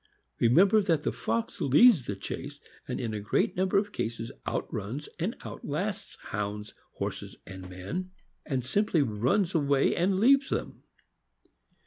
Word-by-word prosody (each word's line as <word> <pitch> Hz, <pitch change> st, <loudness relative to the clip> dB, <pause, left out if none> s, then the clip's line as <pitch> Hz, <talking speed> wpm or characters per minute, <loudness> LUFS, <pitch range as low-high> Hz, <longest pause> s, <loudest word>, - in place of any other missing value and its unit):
Remember 190 Hz, -, +5 dB
that 165 Hz, -7 st, +1 dB
the -, -, 0 dB
fox 115 Hz, 0 st, -3 dB
leads 150 Hz, -, +6 dB
the 100 Hz, -, -2 dB
chase, 140 Hz, +8 st, -6 dB, 0.3 s
and 125 Hz, -, -3 dB
in 115 Hz, -3 st, -3 dB
a 105 Hz, -, -2 dB
great 105 Hz, -, 0 dB
number 185 Hz, +2 st, +2 dB
of 205 Hz, +1 st, +1 dB
cases 115 Hz, -, -4 dB, 0.2 s
outruns 110 Hz, +9 st, -3 dB
and 190 Hz, +9 st, -1 dB
outlasts 195 Hz, +8 st, -4 dB
Hounds, 105 Hz, +1 st, -4 dB, 0.2 s
horses, -, -, -5 dB
and 95 Hz, -1 st, -9 dB
men, 95 Hz, -, -5 dB, 0.3 s
and 130 Hz, -4 st, -2 dB
simply 165 Hz, +1 st, +2 dB
runs 130 Hz, -, +1 dB
away 140 Hz, -4 st, +2 dB
and 185 Hz, +2 st, +1 dB
leaves 270 Hz, +5 st, +5 dB
them. -, -, -3 dB
140 Hz, 140 wpm, -29 LUFS, 110-190 Hz, 0.3 s, leads